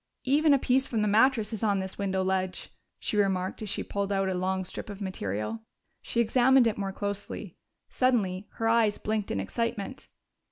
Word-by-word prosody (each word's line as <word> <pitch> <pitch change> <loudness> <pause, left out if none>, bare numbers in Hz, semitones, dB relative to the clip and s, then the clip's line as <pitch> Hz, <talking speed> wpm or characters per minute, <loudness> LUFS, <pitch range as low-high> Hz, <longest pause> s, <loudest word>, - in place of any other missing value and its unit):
"Even 295 +4 +4
a 280 - +6
piece 265 +1 +2
from 220 -3 0
the - - +2
mattress 225 +1 +3
is 220 - -3
on 205 -2 +2
this 190 +1 -5
window 190 -1 0
ledge," 185 -1 -2 0.3
she 210 - -2
remarked 190 -1 0
as 215 - -4
she - - -2
pulled 200 0 -3
out 195 -1 +1
a - - 0
long 185 +1 -1
strip 180 - -6
of 200 -1 -7
material. 110 - -3 0.4
She 235 - -3
examined 250 +2 +5
it 225 -2 +1
more 195 -1 -3
closely. 200 +1 -5 0.4
Suddenly 210 -7 +1
her 225 - -1
eyes 225 -2 +3
blinked 215 -1 -2
in 100 - -1
excitement. 230 - -3
205 Hz, 190 wpm, -28 LUFS, 190-230 Hz, 0.4 s, a